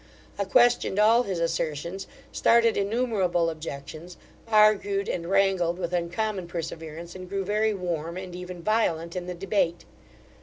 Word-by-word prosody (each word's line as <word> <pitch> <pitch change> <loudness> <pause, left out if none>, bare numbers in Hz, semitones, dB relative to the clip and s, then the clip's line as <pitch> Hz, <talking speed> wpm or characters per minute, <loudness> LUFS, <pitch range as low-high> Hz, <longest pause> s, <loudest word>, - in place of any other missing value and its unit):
I 200 - +1
questioned 240 -1 +3
all 220 +3 +5
his 195 -7 -3
assertions, 170 +2 -2 0.2
started 230 -1 +4
innumerable 200 -6 +1
objections, 155 +2 -8 0.3
argued 210 -2 +3
and 170 0 -3
wrangled 190 -3 +2
with 180 -1 -4
uncommon 180 +2 -2
perseverance, 165 0 -6
and 185 -1 -9
grew 195 0 -2
very 210 +2 +1
warm, 170 -2 -3
and 185 -1 -7
even 180 -1 -8
violent, 170 -6 0
in 180 -1 -4
the 180 - -4
debate. 180 -2 -1
180 Hz, 140 wpm, -26 LUFS, 170-205 Hz, 0.3 s, all